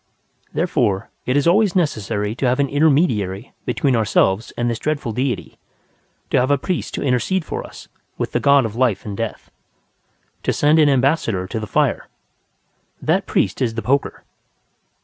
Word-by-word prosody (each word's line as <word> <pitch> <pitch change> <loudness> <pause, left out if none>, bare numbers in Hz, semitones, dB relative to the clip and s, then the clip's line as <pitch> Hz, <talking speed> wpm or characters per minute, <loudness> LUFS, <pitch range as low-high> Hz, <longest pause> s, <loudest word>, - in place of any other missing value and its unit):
Therefore, 125 - 0 0.2
it 130 +2 +2
is 145 - +2
always 195 +2 +3
necessary 110 - -1
to 125 +2 -1
have 125 +2 +1
an 140 -1 +2
intermediary 135 - +1
between 135 -3 +1
ourselves 110 -1 +1
and 120 - 0
this 115 -2 -2
dreadful 145 -6 -2
deity; 125 +3 -3 0.7
to - - +4
have 125 +2 +1
a 145 - +4
priest 180 +6 -3
to - - -3
intercede 145 +7 0
for - - -4
us - - -12 0.3
with - - -3
the - - 0
god 140 -2 +4
of 110 -1 -5
life 120 -6 +1
and 105 -2 -5
death; 115 +1 -5 0.9
to - - 0
send 150 +2 +3
an 150 -2 +5
ambassador 130 - +1
to 110 - -4
the 110 - -5
fire. - - 0 0.9
That - - 0
priest - - 0
is 115 -3 0
the 115 - -3
poker. 140 +2 0
130 Hz, 170 wpm, -20 LUFS, 110-145 Hz, 0.9 s, an